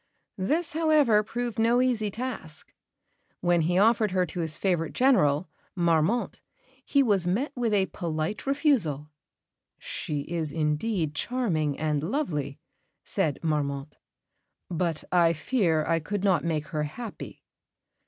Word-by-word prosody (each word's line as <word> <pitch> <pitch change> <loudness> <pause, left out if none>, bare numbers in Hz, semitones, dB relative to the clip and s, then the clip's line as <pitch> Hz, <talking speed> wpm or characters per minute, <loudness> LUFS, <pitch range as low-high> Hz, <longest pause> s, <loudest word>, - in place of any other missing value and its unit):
This, 310 - 0
however, 305 -9 +4
proved 235 +1 -4
no 230 +2 +4
easy 240 -5 +1
task. 220 -9 -6 0.7
When 175 -1 +2
he 175 +3 +1
offered 220 +1 +4
her 185 -1 +1
to 180 - -7
his 160 -2 -3
favourite 175 -5 0
General, 185 - +3 0.3
Marmont, 170 +6 +1 0.4
he 280 -1 +3
was 200 -7 +2
met 235 +12 0
with 240 -3 0
a 200 -2 +3
polite 165 +5 -4
refusal. 215 - +1 0.7
"She 150 -2 -4
is 160 0 -3
indeed 155 +2 -1
charming 160 - -1
and 150 -1 0
lovely," 160 - -2 0.5
said 145 - -1
Marmont; 145 -2 -2 0.7
"but 165 -2 -1
I 170 -2 +4
fear 165 - +1
I 165 0 +1
could 200 +5 -4
not 185 -6 +3
make 155 -3 -2
her 155 0 -2
happy." 205 +10 -7
175 Hz, 130 wpm, -27 LUFS, 155-230 Hz, 0.7 s, however